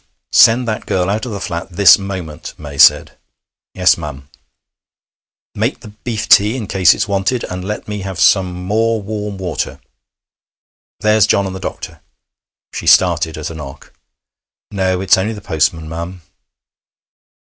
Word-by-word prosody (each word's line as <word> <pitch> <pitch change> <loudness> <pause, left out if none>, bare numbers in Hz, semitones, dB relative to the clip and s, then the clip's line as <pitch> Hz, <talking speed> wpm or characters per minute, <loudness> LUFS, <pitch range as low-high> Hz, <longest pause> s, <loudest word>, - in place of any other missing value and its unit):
'Send 120 +2 +5
that 110 -1 -4
girl 90 +1 0
out 110 +5 -2
of - - -6
the 100 - -5
flat 85 0 -5
this 95 +2 +6
moment!' 95 -6 -7
May 70 -2 -9
said. - - +5 0.6
'Yes, 90 -1 +3
ma'am.' 70 -3 -8 1.2
'Make - - -2
the - - -11
beef 110 +1 -5
tea 105 +5 +5
in 115 - -5
case 95 -4 +3
it's - - -2
wanted, 100 +5 -1
and 90 0 -6
let 105 +2 -5
me 105 -1 -5
have 95 -3 -6
some 95 +2 +3
more 110 +6 -1
warm 105 0 -5
water. 90 -6 -4 1.2
There's 105 -1 +3
John 100 -2 +2
and 95 -1 -5
the - - -6
doctor!' - - -7 0.7
She - - -6
started 80 -1 +3
at 80 +1 -5
a - - -7
knock. 75 -4 -11 0.8
'No, 95 -2 -1
it's 95 0 +3
only 105 +4 -2
the 105 - -8
postman, 80 -3 -1
ma'am.' 85 +2 -7
95 Hz, 155 wpm, -16 LUFS, 85-105 Hz, 1.2 s, this